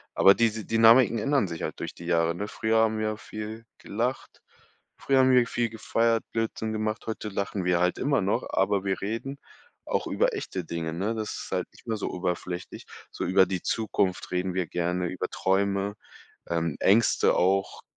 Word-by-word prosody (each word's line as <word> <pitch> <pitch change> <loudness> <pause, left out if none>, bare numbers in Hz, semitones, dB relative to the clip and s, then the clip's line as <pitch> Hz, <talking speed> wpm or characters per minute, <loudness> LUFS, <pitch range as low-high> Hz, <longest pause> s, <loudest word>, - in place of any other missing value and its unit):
aber 95 - +7
diese 110 -2 0
Dynamiken 115 +2 +5
ändern 135 -1 +1
sich 85 -2 -6
halt - - -4
durch - - -5
die 85 - -10
Jahre, 85 -1 +1
ne? 100 +4 -4
Früher 110 +1 0
haben 110 -1 +3
wir 110 - -1
ja 110 - -4
viel 110 +2 -8
gelacht. 120 +5 -4 0.6
Früher 135 -1 +2
haben 130 0 +5
wir 125 -2 +5
viel 120 -3 -1
gefeiert, 115 +1 0
Blödsinn 110 -1 -2
gemacht, 110 +1 -2
heute 110 -1 -4
lachen 100 -1 -3
wir 90 -1 +2
halt 90 +1 +1
immer - - +1
noch, - - 0
aber 100 -2 +1
wir 95 -1 -1
reden 115 +7 -4 0.5
auch - - -1
über - - +1
echte 95 - -4
Dinge, 80 -1 -4
ne? 100 +7 -1
Das 110 -1 -3
ist - - -7
halt - - -1
nicht - - -20
mehr 110 - -1
so - - -3
oberflächlich. 90 0 -4 0.3
So - - -4
über 95 +1 +5
die 90 -1 -3
Zukunft 100 -5 -1
reden 90 0 -1
wir 90 -1 0
gerne, 90 +1 -1
über 95 - -3
Träume, 100 +1 0 0.5
ähm, 85 -3 -1
Ängste 110 +4 +4
auch. 95 +2 +1
100 Hz, 185 wpm, -27 LUFS, 90-115 Hz, 0.6 s, aber